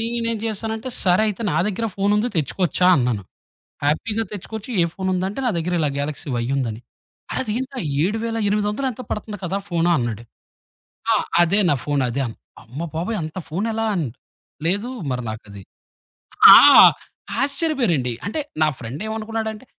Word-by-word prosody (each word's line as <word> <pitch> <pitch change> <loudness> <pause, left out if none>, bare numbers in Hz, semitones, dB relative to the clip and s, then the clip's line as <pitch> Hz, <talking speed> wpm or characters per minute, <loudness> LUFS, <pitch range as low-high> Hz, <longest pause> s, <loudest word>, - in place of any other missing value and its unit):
నేనేం 230 0 -1
జేశానంటే 220 +2 -3 0.2
సరే 185 +2 +4
అయితే 210 +3 -4
నా 155 - -1
దెగ్గర 210 +2 -1
ఫోనుంది 210 +4 +2
తెచ్చుకోవచ్చా? 165 +5 +1
అన్నాను. 120 -6 0 0.6
హ్యాపీగా 210 +10 0
తెచ్చుకోవచ్చు 215 +3 -7
ఏ - - +4
ఫోను 190 -1 -2
ఉందంటే, 190 +6 -2
నా - - +3
దెగ్గర 175 +2 -2
ఇలా 150 - +2
'గ్యాలక్సి 145 +2 -4
వై' 120 - -1
యుందని. 120 -5 -2 0.5
అరే - - -1
ఇదేంటరా 255 +4 -3 0.2
7800 210 +3 -1
ఎంతో 250 +1 -8
పడుతుంది 210 0 -4
కదా! 185 +3 -2
ఫోను 170 -1 +1
అన్నాడు. 115 -2 -3 0.9
ఆ! - - +5 0.3
అదే 175 +4 +2
నా - - +4
ఫోను 145 -2 0
అదే 135 +4 -1 0.4
అమ్మ 125 +7 -9
బాబోయ్ 180 +7 -2
అంత 155 +3 -6
ఫోనెలా 220 +7 -1
అని, 165 -8 -1 0.6
లేదు 205 +8 0 0.2
మరి 125 -1 -2
నాకది. 100 -2 -9 0.9
ఆ! - - +12 0.9
ఆశ్చర్యపోయారండి. 260 - 0
అంటే 210 +11 -2 0.2
నా 155 - +5
ఫ్రెండ్ 130 +6 -7
ఏమనుకున్నాడంటే 220 +1 -4
195 Hz, 145 wpm, -21 LUFS, 150-225 Hz, 0.9 s, ఆ